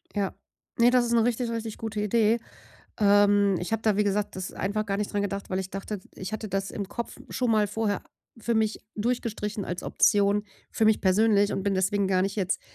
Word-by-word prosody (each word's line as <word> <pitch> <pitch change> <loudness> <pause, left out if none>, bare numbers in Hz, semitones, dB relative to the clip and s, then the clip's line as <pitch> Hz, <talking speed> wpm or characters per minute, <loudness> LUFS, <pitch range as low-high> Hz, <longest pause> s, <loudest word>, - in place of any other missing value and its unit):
Ja. 200 -2 -1 0.5
Ne, 235 +1 +7
das 250 -1 +4
ist 235 - -1
'ne 230 -1 +4
richtig, 245 0 0
richtig 230 -1 -4
gute 220 -2 -4
Idee. 220 +2 +2 0.6
Ähm, 205 -1 +4
ich 180 +5 -4
habe 225 - 0
da, 215 -3 +2
wie 210 - +3
gesagt, 205 -1 -1
das 185 - -5
einfach 210 +3 -2
gar 195 0 -1
nicht 210 0 -3
dran 205 0 0
gedacht, 200 0 -4
weil 185 - 0
ich 190 - -6
dachte, 195 +1 -5
ich 190 +3 -7
hatte 215 -1 -4
das 195 0 -2
im 200 -2 -5
Kopf 235 +2 -5
schon 250 -2 0
mal 215 -2 +3
vorher 205 -1 -1 0.4
für 235 +1 -1
mich 220 -1 +1 0.2
durchgestrichen 215 -2 -2
als 180 0 -4
Option 205 0 +3 0.3
für 220 - +1
mich 215 -1 +4
persönlich, 205 +1 +3
und 195 - -2
bin 200 -1 0
deswegen 195 +1 +1
gar 185 -1 +2
nicht 195 +2 -2
jetzt 190 -1 0
205 Hz, 215 wpm, -27 LUFS, 195-220 Hz, 0.6 s, Ne